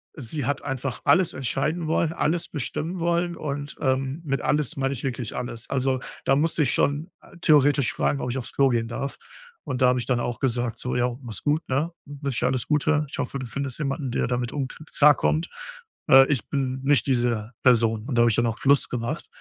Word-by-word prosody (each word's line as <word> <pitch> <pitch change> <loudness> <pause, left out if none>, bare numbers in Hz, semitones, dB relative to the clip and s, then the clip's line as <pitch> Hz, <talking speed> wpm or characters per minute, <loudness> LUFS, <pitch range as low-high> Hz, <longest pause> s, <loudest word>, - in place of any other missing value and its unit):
sie 145 0 -4
hat 145 +1 -1
einfach 135 -2 -4
alles 185 -2 +4
entscheiden 155 +6 -1
wollen, 160 0 +1
alles 165 +1 0
bestimmen 160 +5 -3
wollen 170 +1 0
und, 145 -1 -5
ähm, 135 +3 0
mit 135 -3 -1
alles 150 -2 0
meine 135 0 0
ich 130 - -7
wirklich 125 -3 -3
alles. 120 -2 -5
Also, 130 -1 0 0.3
da 135 - +4
musste 155 +2 +2
ich 130 - +2
schon 145 +5 0 0.3
theoretisch 145 -4 +4
fragen, 140 - 0
„ob 125 - -2
ich 130 - -3
aufs 120 -2 -5
Klo 135 -1 +4
gehen 115 -2 0
darf“. 135 +4 -4 0.5
Und 130 - -4
da 130 - +6
habe 125 0 +3
ich 120 - -4
dann 125 -2 +1
auch 120 -1 -3
gesagt 120 -3 -1
so: 125 - -3
„Ja, 125 0 0
mach's 115 -6 -7
gut, 150 +2 0
ne? 145 +6 0
Ich 145 0 -11
wünsche 135 -4 0
dir - - +4
alles 130 -3 -1
Gute. 150 0 +2
Ich - - -7
hoffe, 135 +2 -3
du 130 - -5
findest 140 +2 -4
jemanden, 140 -2 -2
der - - 0
damit 120 0 -2
um 140 -3 -2
k - - -12 0.2
klarkommt. 150 +2 +4 0.6
Äh, 135 -1 +8
ich 135 -6 0
bin 130 -2 -2
nicht 140 -2 +3
diese 120 -4 0
Person“ 115 -3 +3
und 135 - -2
da - - +6
habe 120 - +5
ich 110 - +1
dann 120 - +2
auch 115 +1 -3
Schluss 140 0 +4
gemacht 120 +6 -3
135 Hz, 220 wpm, -25 LUFS, 125-145 Hz, 0.6 s, Äh